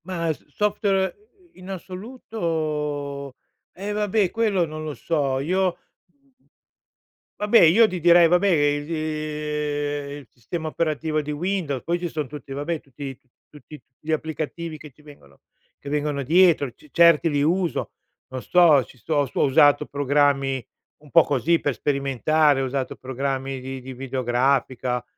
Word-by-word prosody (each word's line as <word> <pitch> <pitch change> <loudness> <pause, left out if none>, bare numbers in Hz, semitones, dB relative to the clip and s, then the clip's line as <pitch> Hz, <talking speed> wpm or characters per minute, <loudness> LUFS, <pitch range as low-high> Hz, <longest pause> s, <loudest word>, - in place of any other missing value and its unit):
Ma 170 -3 -2
s - - -19
software, 200 -2 +1
ehm, 410 -4 -29
in 185 +1 -12
assoluto 160 - -4 0.4
eh, 200 +3 -5
vabbè, 210 -2 +1
quello 210 -6 +1
non 155 0 -7
lo 155 -1 -4
so. 140 -5 -1
Io 180 +4 0 1.6
vabbè, 210 +2 +5
io 190 +8 +6
di 185 -3 -4
direi, 170 0 +6
vabbè, 180 +4 +3
ehm, 150 -1 -2
il 140 - -15
sistema 160 - -6
operativo 155 -1 -1
di 150 0 -5
Windows, 155 -4 -2
poi 170 +1 0
ci 175 - -3
son 150 -3 -4
tutti 145 0 -10
vabbè, 150 +4 -3
tutti 135 0 -8
t - - -49 0.3
tutti 150 +1 -12
tut - - -45
gli 155 - -5
applicativi 160 +1 -4
che 150 -1 -12
ci 140 - -23
vengono 140 - -17 0.4
che 140 - -8
vengono 145 -1 -1
dietro, 165 -1 +4
ce 150 - -21
certi 170 -1 +5
li 145 -2 0
uso. 170 +3 0 0.4
Non 130 -1 -6
sto 165 -5 +5
ci 125 - -18
sto 145 +4 0
sto 130 - -3
ho - - +5
usato 145 +1 +4
programmi 140 -2 +1 0.3
un 150 0 -19
po' 165 +2 +6
così 155 +5 +1
per 145 - -1
sperimentare, 140 +2 +1
ho - - 0
usato 130 0 -3
programmi 135 +1 -3
di 130 0 -7
di 130 +1 -8
videografica, 125 -1 0
150 Hz, 155 wpm, -23 LUFS, 140-170 Hz, 1.6 s, io